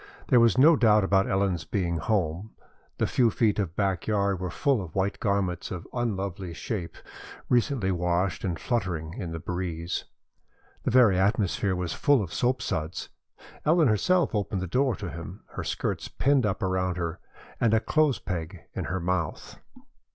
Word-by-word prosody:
There 125 - +6
was 115 -1 +4
no 155 +5 +7
doubt 105 -6 +4
about 95 0 +2
Ellen's 95 -4 +1
being 85 0 -1
at - - -5
home. 95 -1 -1 0.4
The - - +1
few 120 -3 +3
feet 110 -1 +1
of 90 -4 -2
back 95 -3 -1
yard 100 -3 +1
were 90 -1 -3
full 130 +6 +1
of 90 -4 -9
white 100 +1 0
garments 100 -4 -1
of 90 -3 -6
unlovely 100 -7 -3
shape, 85 -4 -4 0.5
recently 120 -5 +2
washed 90 -1 0
and 90 -4 -1
fluttering 90 -8 -2
in 85 -2 -5
the 80 - -4
breeze. 85 0 -3 0.8
The - - +2
very 115 -7 +5
atmosphere 100 -1 +1
was 90 -1 -2
full 145 -6 +3
of 90 - -7
soapsuds. 105 -10 -1 0.5
Ellen 160 -3 +4
herself 175 - +2
opened 100 -3 -1
the - - -1
door 125 +6 +1
to 95 -5 -6
him, 90 +5 -8
her - - -5
skirts - - -2
pinned 135 -4 +2
up 100 - -2
around 95 -1 0
her, 85 -2 -3 0.4
and 115 -3 +3
a 110 - +4
clothes 150 +1 +2
peg 85 0 -5
in - - -3
her 95 - -2
mouth. 85 -3 -3
95 Hz, 170 wpm, -27 LUFS, 90-115 Hz, 0.8 s, no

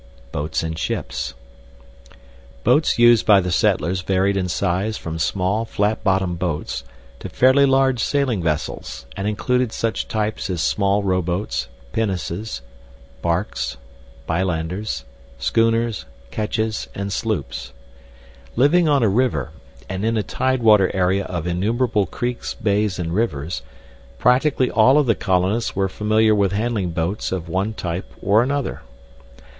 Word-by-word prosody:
BOATS 75 +2 -2
AND 80 0 -4
SHIPS 60 -5 -3 1.3
Boats 155 - +3
used 120 -1 +6
by 105 -2 +6
the 90 -1 -2
settlers 85 +2 +1
varied 95 +1 +1
in 95 -2 0
size 95 +4 -1
from 80 0 -5
small 95 +6 0
flat 110 -1 -1
bottom 95 -2 +1
boats 85 -4 -3 0.4
to - - -7
fairly 130 +2 +5
large 135 -3 +3
sailing 135 -9 +1
vessels, 75 -5 -3
and 100 - -2
included 125 +3 0
such 115 0 -2
types 110 -1 -2
as 90 -2 -2
small 100 +9 +1
rowboats, 90 - -1 0.3
pinnaces, 95 - -2 0.6
barks, 85 -7 -1 0.5
bilanders, 85 -2 -2 0.3
schooners, 115 - +1 0.3
ketches, 110 0 -2
and 100 0 -3
sloops. 70 - -3 0.8
Living 155 +6 +4
on 140 -4 +3
a - - +4
river, 100 - +1 0.4
and 95 +1 -4
in 115 +1 +1
a 105 - +1
tidewater 115 -7 +3
area 95 +1 +1
of 85 -3 -4
innumerable 105 +4 +1
creeks, 120 +5 -3
bays, 105 -3 0
and 85 -2 -3
rivers, 85 - -1 0.6
practically 130 - +3
all 120 +6 +5
of 150 - +4
the 115 - +4
colonists 95 +4 0
were 95 0 +1
familiar 110 +3 +2
with 100 -2 +2
handling 105 -3 -1
boats 85 +5 -2
of 90 -3 -3
one 95 +6 -1
type 85 -1 -4
or 105 +3 +4
another. 140 +2 -2
100 Hz, 130 wpm, -21 LUFS, 90-115 Hz, 1.3 s, used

